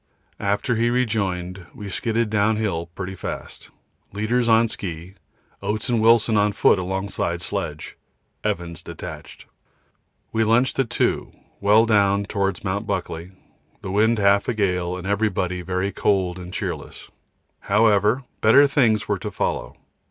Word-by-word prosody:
After 100 +4 0
he 120 +1 +2
rejoined 95 -7 -1
we 105 - -7
skidded 115 +2 -1
downhill 105 -5 +1
pretty 95 0 -5
fast, 95 - -7 0.4
leaders 115 +4 0
on 115 +1 +5
ski, 90 -4 -6 0.5
Oates 105 +3 -2
and 120 -2 +2
Wilson 115 -1 +4
on 105 0 +2
foot 100 - +4
alongside 90 -2 -2
sledge - - -4 0.5
Evans 85 -2 -3
detached. - - -9 0.9
We 110 - +1
lunched 120 +5 +2
at 130 -4 +1
2 - - 0 0.3
well 105 +3 +5
down 100 -2 +3
towards 100 -2 -2
Mt. 100 +2 -2
Buckley, 90 -3 -3 0.5
the 95 - -5
wind 110 +3 +3
half 100 0 +3
a 125 - 0
gale 90 -3 0
and 90 - -8
everybody 95 -3 0
very 95 +2 -2
cold 95 -3 0
and 90 0 -8
cheerless. - - -6 0.5
However, 105 +3 +3 0.2
better 135 +7 +7
things 115 -7 +2
were 100 -2 0
to 105 - -4
follow. 105 - -3
100 Hz, 135 wpm, -23 LUFS, 95-110 Hz, 0.9 s, better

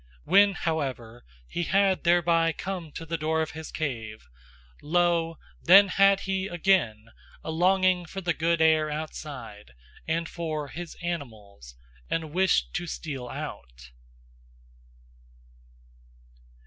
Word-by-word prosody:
When 200 0 +5
however 135 -10 -3 0.2
he 175 - -3
had 190 +2 +2
thereby 170 -1 +3
come 180 -2 -5
to 165 - -7
the 165 +1 -3
door 160 +1 0
of 155 - -6
his 160 0 -8
cave, 115 -8 -5 0.6
lo, 165 0 +1 0.2
then 195 +3 +7
had 195 +1 +4
he 190 0 -2
again 155 - +1 0.3
a - - -4
longing 185 +1 +2
for 195 - -6
the 175 -2 -1
good 165 +1 0
air 155 -1 +3
outside, 140 - -7 0.3
and 165 +1 -1
for 155 -4 -4
his 175 +2 -8
animals, 110 - -7 0.3
and 160 -2 -3
wished 190 +1 +2
to 175 -1 -5
steal 135 -6 -6
out. - - -8
165 Hz, 120 wpm, -27 LUFS, 145-175 Hz, 0.6 s, then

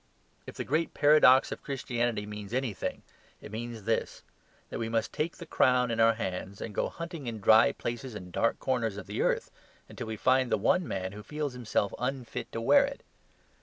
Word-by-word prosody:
If - - -8
the - - -3
great 155 +4 -1
paradox 145 -3 +6
of - - -5
Christianity 120 -5 -2
means 105 +1 -6
anything, 130 -7 -2 0.4
it - - -11
means 115 0 -6
this 110 +2 -1 0.5
that - - -4
we 115 -1 -2
must 115 -1 -1
take 160 +2 -2
the 170 - -8
crown 125 -5 +3
in 115 - -2
our 115 0 +5
hands, 95 0 -4
and 110 - -6
go - - 0
hunting 165 -5 -7
in 115 -2 -4
dry 110 +2 +6
places 120 0 -5
and 90 -3 -8
dark 115 - +1
corners 115 -6 -1
of 105 - -7
the - - -3
earth - - 0 0.4
until - - -7
we 110 -1 -4
find 130 +2 +2
the - - +3
one 180 -2 +2
man 95 -1 -3
who 105 +1 -9
feels 150 +4 -4
himself 115 -4 -1
unfit 125 -1 -4
to - - -4
wear 280 - +6
it. 275 0 -5
120 Hz, 200 wpm, -29 LUFS, 110-135 Hz, 0.5 s, paradox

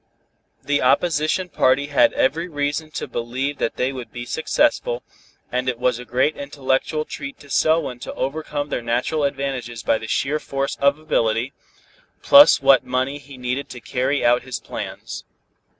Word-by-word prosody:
The 145 0 +1
opposition 160 +5 +2
party 135 -4 +2
had - - +5
every 160 +6 +1
reason 145 0 -2
to 155 - -5
believe 130 +4 -3
that - - -1
they 130 +2 -1
would 125 -2 -8
be 120 0 -6
successful, 300 - 0 0.5
and 125 +1 0
it 125 - -2
was 125 -1 0
a 125 - -8
great 130 +6 +1
intellectual 140 +2 -1
treat 140 -1 -7
to 140 - -14
Selwyn 155 -6 +2
to - - -7
overcome 145 +1 -3
their 125 - -2
natural 120 +6 0
advantages 135 -5 -3
by 110 - +2
the 110 - -7
sheer 145 +6 0
force 135 -1 -3
of 140 +1 +3
ability, 120 -5 0 0.7
plus 280 - +8
what 135 -2 +6
money 130 +3 -1
he 140 -1 -13
needed 125 +3 -3
to 120 - -8
carry 130 +3 -1
out 120 +1 +4
his 130 -1 -5
plans. - - -7
135 Hz, 165 wpm, -22 LUFS, 125-145 Hz, 0.7 s, plus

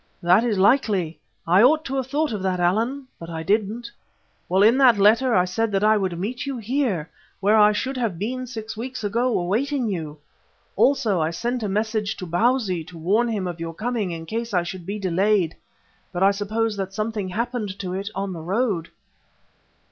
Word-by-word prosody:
"That 180 +6 +5
is 225 -4 0
likely. 195 - +2 0.3
I 180 +4 +5
ought 310 +6 +4
to 270 - -3
have 260 -2 -2
thought 290 -1 0
of 205 - -3
that, 185 -1 -1
Allan, 225 +10 0
but 165 - -8
I 160 -1 -5
didn't. 215 +5 -1 0.6
Well, 190 +2 +4
in 225 +4 +6
that 250 -5 +6
letter 225 +5 +4
I 180 - +4
said 225 +4 -1
that 195 +1 +1
I 215 +1 +5
would 190 -4 -1
meet 235 +9 -4
you 275 -2 -3
here, 230 - -1 0.3
where 205 +3 +3
I 210 -1 +6
should 260 +6 -2
have 225 -8 -1
been 250 +7 -3
six 220 -2 -6
weeks 250 +1 -6
ago 235 +4 +1
awaiting 235 +8 0
you. 160 -6 -4 0.6
Also 240 - +2
I 155 - +1
sent 240 +9 -2
a 210 - -2
message 215 +1 -1
to 185 - -6
Bausi 185 0 +1
to 170 - -12
warn 200 +9 +2
him 210 -5 -2
of 175 -2 -5
your 165 -1 -5
coming 225 -1 -2
in 165 -1 -6
case 230 +3 -3
I 175 - +3
should 175 0 -7
be 205 +2 -3
delayed, 190 -2 +1 0.6
but 180 0 -1
I 195 - +6
suppose 215 +2 -1
that 195 0 -4
something 215 -2 -2
happened 220 -1 -3
to 185 -2 -4
it 195 +2 -3
on 195 0 -3
the 165 - -7
road." 190 -1 -1
210 Hz, 200 wpm, -23 LUFS, 185-235 Hz, 0.6 s, in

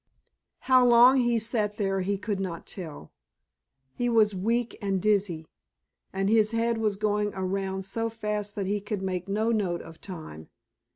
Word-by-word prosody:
How 255 -1 +5
long 245 +2 +7
he 240 -2 +2
sat 215 -2 -1
there 195 -2 0
he 200 +2 -1
could 205 0 -3
not 180 -4 -4
tell. 155 - -8 0.8
He 245 0 -1
was 220 -3 +4
weak 230 +5 -1
and 195 -2 0
dizzy, 195 -5 +1 0.7
and 195 0 -1
his 215 +1 +3
head 230 0 +1
was 215 -2 +1
going 210 0 0
around 190 0 -2
so 225 +4 -2
fast 210 -2 -4
that 200 - -2
he 205 +2 -1
could 205 -1 -4
make 185 0 -3
no 215 +3 0
note 190 -6 -1
of 165 0 -13
time. 155 - -9
205 Hz, 165 wpm, -27 LUFS, 190-225 Hz, 0.8 s, long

